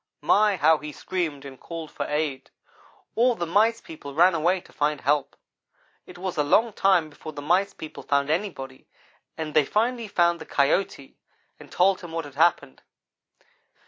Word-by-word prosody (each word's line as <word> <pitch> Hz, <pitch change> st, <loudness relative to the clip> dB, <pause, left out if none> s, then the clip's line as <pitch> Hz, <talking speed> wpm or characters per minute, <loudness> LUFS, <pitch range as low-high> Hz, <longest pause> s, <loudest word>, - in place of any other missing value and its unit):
My! 210 Hz, -1 st, +4 dB
how 160 Hz, -2 st, +4 dB
he 150 Hz, 0 st, -7 dB
screamed 155 Hz, -4 st, -4 dB
and 135 Hz, -2 st, -10 dB
called 165 Hz, -2 st, -8 dB
for -, -, -4 dB
aid. 150 Hz, -2 st, -2 dB, 0.6 s
All 240 Hz, +1 st, +3 dB
the 175 Hz, -, -3 dB
Mice 215 Hz, +7 st, +2 dB
people 145 Hz, -7 st, -10 dB
ran 175 Hz, +3 st, +5 dB
away 170 Hz, +3 st, +1 dB
to -, -, -20 dB
find 150 Hz, 0 st, -1 dB
help. 145 Hz, +2 st, 0 dB, 0.7 s
It -, -, -12 dB
was 185 Hz, -1 st, -5 dB
a 150 Hz, -, +3 dB
long 220 Hz, +10 st, +3 dB
time 180 Hz, -6 st, +2 dB
before 155 Hz, +1 st, -10 dB
the 145 Hz, -, -7 dB
Mice 190 Hz, +6 st, +1 dB
people 155 Hz, -, -9 dB
found 140 Hz, +1 st, 0 dB
anybody, 155 Hz, -8 st, -4 dB, 0.5 s
but 155 Hz, -2 st, -5 dB
they 155 Hz, -, +5 dB
finally 230 Hz, -, -1 dB
found 170 Hz, -3 st, +1 dB
the -, -, -9 dB
Coyote, 140 Hz, 0 st, 0 dB, 0.4 s
and -, -, -14 dB
told 190 Hz, +1 st, +2 dB
him 175 Hz, -3 st, -9 dB
what 165 Hz, -2 st, -3 dB
had 145 Hz, -, -11 dB
happened. 155 Hz, -, +1 dB
165 Hz, 175 wpm, -25 LUFS, 145-190 Hz, 0.7 s, ran